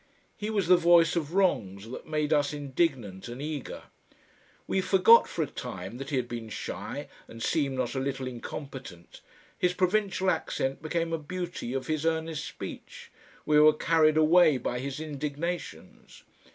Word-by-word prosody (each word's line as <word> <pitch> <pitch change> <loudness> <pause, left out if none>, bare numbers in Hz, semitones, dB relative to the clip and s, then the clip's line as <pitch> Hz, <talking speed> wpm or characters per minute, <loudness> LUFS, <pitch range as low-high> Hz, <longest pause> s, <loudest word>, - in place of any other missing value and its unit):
He 210 - -4
was 200 -5 0
the 180 0 +7
voice 170 -1 +5
of 165 0 -2
wrongs 110 - +1
that - - -8
made 150 -1 0
us 145 -1 +2
indignant 130 - -2
and 120 +2 -7
eager. 150 -1 -5 0.8
We 190 - 0
forgot 190 +5 +6
for 165 - -2
a - - -1
time 120 -5 -7
that 135 0 -6
he 145 - -1
had 125 -2 0
been 115 -2 -6
shy - - -5 0.2
and 115 0 -8
seemed 140 -5 0
not 125 -2 -1
a 135 - -2
little 135 0 -3
incompetent, 125 - -8 0.4
his 180 0 +1
provincial 190 0 +1
accent 135 +2 -2
became 165 +1 -2
a 165 - 0
beauty 175 -5 -5
of 135 - -2
his 155 -1 -1
earnest 160 -1 -1
speech, - - -9 0.3
we 150 0 +4
were 155 0 +7
carried 155 0 +3
away 155 -1 +5
by 125 0 -3
his 135 +2 -4
indignations. 150 - -5
150 Hz, 165 wpm, -28 LUFS, 130-170 Hz, 0.8 s, the